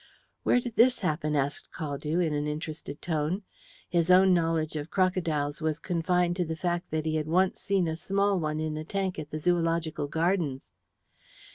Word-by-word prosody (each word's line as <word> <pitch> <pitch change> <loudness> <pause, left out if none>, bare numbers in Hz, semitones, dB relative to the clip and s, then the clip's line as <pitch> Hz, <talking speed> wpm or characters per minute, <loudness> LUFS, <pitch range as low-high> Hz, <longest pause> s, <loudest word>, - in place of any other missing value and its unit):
"Where 245 - +3
did 240 -2 -6
this 245 +1 +5
happen?" 155 -4 0
asked 140 0 -1
Caldew, 150 +2 -2
in 155 - -1
an 145 0 -1
interested 150 -1 -5
tone. 165 +4 -1 0.4
His 170 -1 +1
own 185 +1 +7
knowledge 165 -2 +1
of 150 +1 -4
crocodiles 165 -6 0
was 155 -1 0
confined 175 +1 0
to 180 - +2
the 160 -1 -3
fact 175 +2 -2
that 155 0 -2
he 155 0 0
had 155 -1 -2
once 180 +3 +2
seen 195 -3 +1
a 160 - -1
small 200 +3 +1
one 155 -1 -2
in 155 -1 -2
a 155 - -4
tank 190 0 -2
at 150 -1 -6
the 155 - -4
Zoological 165 -2 0
Gardens. 160 -3 -1
165 Hz, 180 wpm, -28 LUFS, 155-180 Hz, 0.4 s, own